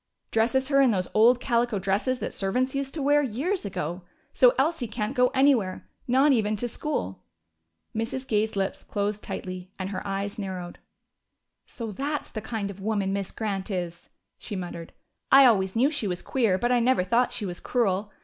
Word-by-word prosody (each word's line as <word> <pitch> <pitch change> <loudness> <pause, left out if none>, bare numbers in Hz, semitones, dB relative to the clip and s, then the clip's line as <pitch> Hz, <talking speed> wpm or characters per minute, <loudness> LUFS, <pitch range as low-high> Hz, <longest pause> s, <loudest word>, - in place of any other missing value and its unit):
Dresses 260 +4 +2
her 275 -1 +5
in 265 - +5
those 185 -5 0
old 235 +3 +5
calico 235 -3 +1
dresses 195 +7 0
that - - -5
servants 250 +7 0
used 275 0 -3
to 300 - -2
wear 290 +1 +4
years 290 - -1
ago. 180 -2 -4 0.3
So 250 -1 +5
Elsie 280 -2 +1
can't 215 +1 -3
go 250 0 +5
anywhere, 255 -9 +2 0.2
not 265 +4 +4
even 215 -4 +2
to 240 +4 -3
school." 95 - -4 0.7
Mrs. 230 +4 -3
Gay's 215 0 0
lips 195 -1 -2
closed 205 0 -2
tightly, 185 -1 -6
and 190 0 -4
her 185 - -3
eyes 200 +1 -3
narrowed. 185 -3 -5 0.9
"So 230 -3 -6
that's 285 +7 -3
the 215 - -5
kind 215 -2 -3
of 200 - -12
woman 200 -2 0
Miss 200 -1 -2
Grant 200 -2 -3
is!" 175 -3 -4 0.3
she 210 - -6
muttered. 175 -3 -6 0.4
"I 275 0 +9
always 190 -5 +3
knew 260 +6 +3
she 280 -9 -2
was 180 -2 -3
queer, 225 -8 +1
but 240 +5 0
I 245 - +4
never 245 -4 +3
thought 235 +7 +2
she 230 -4 -2
was 175 -2 -5
cruel.... 210 -4 0
220 Hz, 185 wpm, -26 LUFS, 195-255 Hz, 0.9 s, I